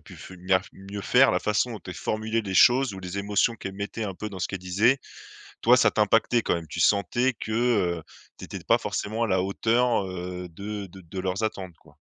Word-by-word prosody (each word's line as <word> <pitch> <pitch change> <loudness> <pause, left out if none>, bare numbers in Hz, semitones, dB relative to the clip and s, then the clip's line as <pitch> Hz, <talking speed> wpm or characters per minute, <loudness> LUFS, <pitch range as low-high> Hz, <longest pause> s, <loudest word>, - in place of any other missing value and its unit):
pu - - -15
mieux - - -14
faire 95 0 -1
mieux 100 +1 -8
faire», 130 +6 +5
la 90 - +2
façon 105 +3 0
dont 110 - -7
elle 90 - -6
formulait 110 +1 -2
les 95 -2 -5
choses 125 +3 +5
ou 95 - -8
les 90 +1 -5
émotions 105 +3 +1
qu'elle 95 - -6
mettait, 105 +2 -4
un 95 -2 -4
peu, 105 +3 -5
dans 95 -2 -8
ce 90 - -1
qu'elle 95 - -4
disait, 105 +9 +2 0.6
toi, 125 +2 +6
ça 105 -3 +4
t'impactait 115 +2 +2
quand - - +1
même. 85 -1 -4
Tu - - -5
sentais 115 +6 +2
que, 110 - -5
heu, 105 -8 +1 0.4
tu - - -8
étais - - -7
pas - - +3
forcément 110 +3 -3
à 115 - +2
la 95 -2 +1
hauteur, 115 +3 +1
heu, 90 0 -6
de 100 +3 -6
de 95 +1 -13
de 95 +2 -9
leurs 95 +2 -2
attentes, 95 -6 -4
quoi? - - -22
100 Hz, 230 wpm, -26 LUFS, 95-115 Hz, 0.6 s, toi